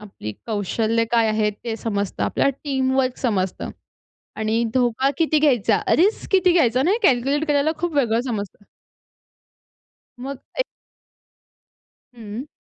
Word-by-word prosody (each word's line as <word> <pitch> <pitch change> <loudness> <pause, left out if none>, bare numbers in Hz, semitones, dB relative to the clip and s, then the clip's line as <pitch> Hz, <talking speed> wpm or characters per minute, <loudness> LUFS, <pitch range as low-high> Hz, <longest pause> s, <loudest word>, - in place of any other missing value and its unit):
आपली 195 - -8
कौशल्य 225 +2 0
काय 230 -2 +3
आहे 215 -1 +1
ते 220 +2 -6
समजतं. 205 -3 -3
आपल्या - - +1 0.2
टीमवर्क 265 -2 0
समजतं 195 -7 -1 0.7
आणि 220 +2 0
धोका 255 +2 +2
किती 315 -1 +3
घ्यायचा, 245 -8 +3 0.2
रिस्क 400 +6 +1
किती 370 -2 +5
घ्यायचा 255 -7 +3
नाही 370 +9 +2
हे - - +5
कॅल्क्युलेट 275 +4 +1
करायला 295 +2 +2
खूप 345 -2 -2
वेगळं 235 -5 +2
समजतं. 210 -5 -5 1.6
मग 270 +1 -5 0.2
एक - - +3 1.5
हं. 225 +3 -7
245 Hz, 125 wpm, -22 LUFS, 220-280 Hz, 1.6 s, किती